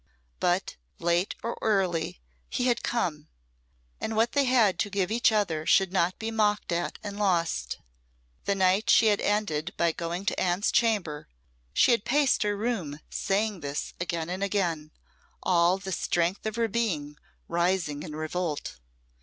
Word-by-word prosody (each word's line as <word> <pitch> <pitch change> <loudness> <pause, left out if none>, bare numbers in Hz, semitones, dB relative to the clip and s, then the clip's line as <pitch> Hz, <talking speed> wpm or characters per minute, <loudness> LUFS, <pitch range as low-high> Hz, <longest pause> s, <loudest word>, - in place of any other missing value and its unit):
But, 180 +2 0 0.2
late 175 +3 0
or 230 - -2
early, 180 - 0 0.3
he 250 - -1
had 240 -2 +2
come; 160 -10 -2 0.7
and 220 - -3
what 225 +2 +2
they 280 -1 +2
had 225 -8 +3
to 205 - 0
give 200 -1 -1
each 230 0 +3
other 190 -8 0
should 190 -1 +4
not 180 -1 +1
be 225 0 -4
mocked 210 -3 +1
at 175 0 -1
and 205 -1 -6
lost. 170 - 0 0.7
The 200 - +1
night 190 +3 +2
she 225 - +6
had 205 - -2
ended 185 -5 -1
by 170 -1 +3
going 170 +3 -4
to - - 0
Anne's 180 +3 +1
chamber, 205 -11 +1 0.4
she 70 - +4
had 230 -4 +2
paced 280 +2 +2
her 205 -1 0
room 200 -10 -2
saying 205 0 0
this 140 -1 -4
again 170 -1 -2
and 185 +2 -4
again, 175 -6 -1 0.5
all 175 +1 +3
the 190 0 -6
strength 175 +3 0
of 215 - -3
her 230 -1 +1
being 180 -11 -2 0.3
rising 170 -4 0
in 155 -2 -7
revolt. 155 - -3
190 Hz, 160 wpm, -27 LUFS, 170-215 Hz, 0.7 s, she